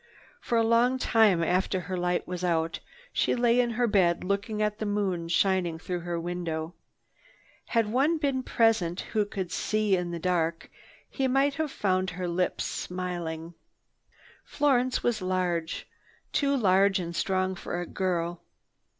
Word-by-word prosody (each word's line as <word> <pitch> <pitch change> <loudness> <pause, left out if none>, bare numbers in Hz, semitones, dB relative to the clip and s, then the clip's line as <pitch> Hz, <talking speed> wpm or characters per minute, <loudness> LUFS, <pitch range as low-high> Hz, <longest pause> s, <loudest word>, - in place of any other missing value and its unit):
For 235 - -1
a 230 - +4
long 235 +3 +3
time 215 -8 +3
after 185 +2 +1
her 185 +1 -4
light 180 0 -1
was 180 0 -5
out, 165 -2 0 0.3
she - - +1
lay 240 0 +3
in 245 -1 +3
her 240 +1 +1
bed 185 -6 +2
looking 200 +3 -2
at 210 0 0
the 215 - -2
moon 195 -5 -1
shining 175 -1 +1
through 180 +2 -4
her 170 0 -3
window. 165 -1 -4 0.9
Had 230 -2 +2
one 285 +7 +2
been 275 -4 0
present 220 -8 +1
who 210 -2 -1
could 190 -4 -4
see 215 +2 +1
in 180 -1 -2
the 170 - -4
dark, 170 -1 -1 0.4
he 270 -2 -1
might 270 +2 +2
have 310 +1 -2
found 185 -4 0
her 180 +1 -4
lips 180 +1 -1
smiling. 175 -2 -4 0.9
Florence 255 -3 +1
was 235 -4 0
large, 180 -3 -1 0.5
too 280 -2 +2
large 195 -2 +4
and 170 -2 -4
strong 185 0 0
for 175 -1 -5
a 175 - -3
girl. 175 -2 -2
185 Hz, 155 wpm, -28 LUFS, 175-225 Hz, 0.9 s, a